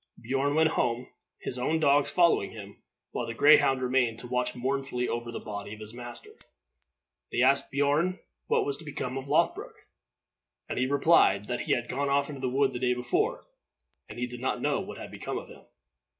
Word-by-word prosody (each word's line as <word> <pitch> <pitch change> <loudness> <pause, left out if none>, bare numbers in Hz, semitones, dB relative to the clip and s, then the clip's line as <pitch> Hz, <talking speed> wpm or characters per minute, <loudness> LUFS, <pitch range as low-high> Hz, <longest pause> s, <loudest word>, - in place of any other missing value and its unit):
Beorn 135 +4 0
went 160 0 +4
home, 120 -3 -1 0.3
his 125 - -4
own 155 +6 +1
dogs 145 -2 +4
following 170 - +3
him, 100 -2 -11 0.3
while - - -3
the 115 - -5
greyhound 140 -1 +5
remained 125 -3 +1
to 125 - -8
watch 125 0 -1
mournfully 130 -1 -2
over 120 0 -3
the - - -5
body 105 0 -6
of - - -16
his 110 +1 -9
master. 120 0 -6 1.0
They 120 - +2
asked 135 +2 +4
Beorn 145 +6 +1 0.3
what - - +2
was 140 -1 -2
become 140 -4 -5
of 135 0 -5
Lothbroc, 165 +3 +1 0.9
and - - -3
he 130 - +2
replied 140 - +4
that 120 - -1
he - - 0
had 120 -1 -3
gone 140 +2 -1
off 140 +1 +1
into 140 -3 -7
the 130 - 0
wood 135 +1 +2
the 120 - -4
day 125 -1 +1
before, 125 0 -1 0.6
and - - -9
he 125 - -1
did 125 0 -8
not 130 - -1
know - - 0
what - - -7
had - - -8
become - - -5
of - - -8
him. - - -13
130 Hz, 195 wpm, -28 LUFS, 120-140 Hz, 1.0 s, greyhound